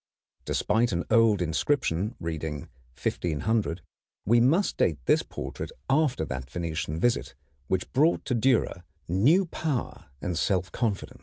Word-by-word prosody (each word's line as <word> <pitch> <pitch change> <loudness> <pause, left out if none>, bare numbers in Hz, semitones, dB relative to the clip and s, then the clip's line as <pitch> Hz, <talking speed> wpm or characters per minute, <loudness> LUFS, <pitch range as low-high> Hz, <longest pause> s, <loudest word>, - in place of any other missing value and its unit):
Despite 115 +3 +1
an 85 0 0
old 115 -5 +5
inscription 100 - 0
reading 80 -3 -4 0.4
1500, 90 +3 -1 0.4
we 120 +4 +5
must 155 +12 +3
date - - +2
this - - +4
portrait - - -6 0.2
after 135 - +2
that 65 -2 -5
Venetian 80 -1 -3
visit 120 +4 0 0.3
which 95 -1 -2
brought 155 +6 +3
to - - -1
Dürer 120 -6 +2 0.3
new 135 - +4
power 155 -6 -3
and 90 +4 -3
self 95 +2 0
confidence. 110 -5 -2
105 Hz, 130 wpm, -27 LUFS, 85-125 Hz, 0.4 s, old